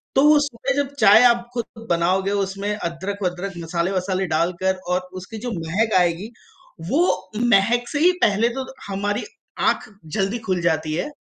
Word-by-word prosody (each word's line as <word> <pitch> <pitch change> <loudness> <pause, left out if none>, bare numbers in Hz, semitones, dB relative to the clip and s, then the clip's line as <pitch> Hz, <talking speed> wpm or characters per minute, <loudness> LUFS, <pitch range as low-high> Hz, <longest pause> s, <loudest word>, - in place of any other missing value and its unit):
तो 270 - +5
वो 300 0 +7
सुबह 270 -2 -2
जब 280 0 -1
चाय 215 +4 +7
आप 235 -1 +4
खुद 230 -1 -6
बनाओगे 185 +3 +1
उसमें 200 0 -2
अदरक-वदरक, 190 +1 -4
मसाले-वसाले 185 +3 -1
डालकर 175 +4 0 0.2
और 180 - +2 0.2
उसकी 220 +4 -9
जो 245 - -2
महक 185 +5 -1
आएगी 175 +5 0 0.6
वो - - +3 0.5
महक 235 +4 +3
से 290 - -2
ही 355 +3 +6
पहले 215 +3 +3
तो 265 - -3 0.2
हमारी 205 +1 -2 0.5
आँख - - -2 0.3
जल्दी 195 +4 0
खुल 185 -2 0
जाती 160 -2 0
है। 180 - -2
195 Hz, 155 wpm, -22 LUFS, 180-230 Hz, 0.6 s, वो